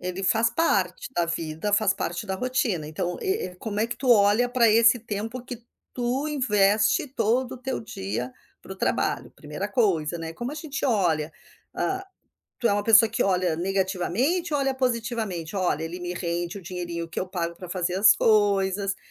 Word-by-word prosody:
Ele 185 +1 -4
faz 225 +4 +3
parte 195 - 0
da 175 -1 +2
vida, 165 +4 -3
faz 205 -2 +3
parte 175 +5 -4
da 190 - -2
rotina. 230 -8 -1
Então 175 +3 -3
e 390 - -1
e 180 - -15
como 210 +1 -4
é 225 - +2
que 235 - -5
tu 255 -2 0
olha 210 +2 +5
pra 245 -2 +4
esse 230 +2 +5
tempo 225 +3 -5
que 245 -2 -8 0.3
tu 255 +4 -1
investe 215 -4 +2
todo 250 0 0
o - - -6
teu 260 +1 -3
dia 120 - -5 0.3
para - - -10
o - - -10
trabalho? - - -1
1a 150 +7 -6
coisa, 175 -8 +1
né. 165 0 -5
Como 245 +3 -5
a - - -5
gente 300 -3 -5
olha, 170 - +1 0.4
ah, 385 0 -2 0.6
tu 235 - +2
é - - +2
uma 205 - 0
pessoa 225 +1 +6
que 230 - 0
olha 180 -4 +1
negativamente 195 - 0
ou 290 - +2
olha 270 -1 +1
positivamente, 230 -9 -2
"Olha, 175 -5 0
ele 170 +3 -5
me 175 0 -4
rende 175 +1 -3
o - - -14
dinheirinho 170 -1 -5
que - - -4
eu 185 - -3
pago 170 -2 -3
para 180 0 -10
fazer 180 0 -1
as 195 +1 +6
coisas. 200 -2 +2
200 Hz, 190 wpm, -25 LUFS, 175-240 Hz, 0.6 s, pessoa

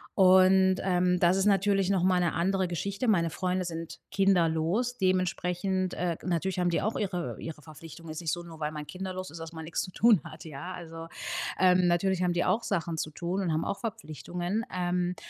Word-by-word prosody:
Und, 190 0 +6
ähm, 180 -1 +2
das 175 +1 +4
ist 195 - +1
natürlich 195 -1 +3
noch 195 -3 +2
mal 185 -1 +3
'ne 170 - +1
andere 190 +2 +1
Geschichte. 200 +7 -2
Meine 170 -6 +3
Freunde 185 +2 -1
sind 165 -1 -6
kinderlos. 195 +5 +2
Dementsprechend, 185 0 0
äh, 175 -2 -1
g - - -14
natürlich 180 +2 -1
haben 180 - +2
die 170 - 0
auch 215 +3 -1
ihre 180 -4 -3
ihre 160 -2 -7
Verpflichtungen 160 +3 -12
ist 160 +2 -6
nicht 160 - -1
so, 175 - -3
nur 165 -2 -11
weil 150 0 -2
man 150 -1 -7
kinderlos 185 0 -5
ist, 165 - -10
dass 165 0 -7
man 160 -1 -7
nix 165 - -2
zu 185 - -8
tun 215 -5 +4
hat, 155 +1 -11
ja, 155 +4 -7
also. 165 -2 -8 0.5
Ähm, 185 -1 +5
natürlich 185 +1 +1
haben 175 -1 +2
die 175 - 0
auch 230 - +1
Sachen 170 -4 -2
zu 155 0 -3
tun 175 +5 -3
und 180 -4 0
haben 155 - 0
auch 200 - -3
Verpflichtungen, 180 - -4
ähm, 180 0 0
180 Hz, 210 wpm, -29 LUFS, 165-190 Hz, 0.5 s, Und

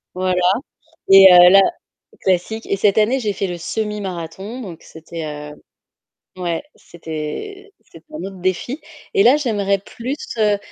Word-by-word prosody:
voilà, 185 0 0 0.7
et 195 0 +9
heu, 180 0 +9
là 195 +1 +7 0.6
classique 190 +5 -1
et 195 - -1
cette 200 +1 +2
année, 235 +6 +2
j'ai 210 -5 -2
fait 195 - -2
le 175 -1 -5
semi-marathon, 200 +2 -5
donc 175 -7 -9
c'était, 160 0 -8
heu 150 -1 -7 0.9
ouais, 170 -2 -2
c'était 175 - -8
c'était - - -17
un 305 - -6
autre 195 -1 -8
défi 185 - -2 0.3
et 395 - +3
là, 270 +4 +6
j'aimerais 205 -8 0
plus, 240 +7 -6 0.2
heu, 210 -1 +3
195 Hz, 145 wpm, -19 LUFS, 175-220 Hz, 0.9 s, et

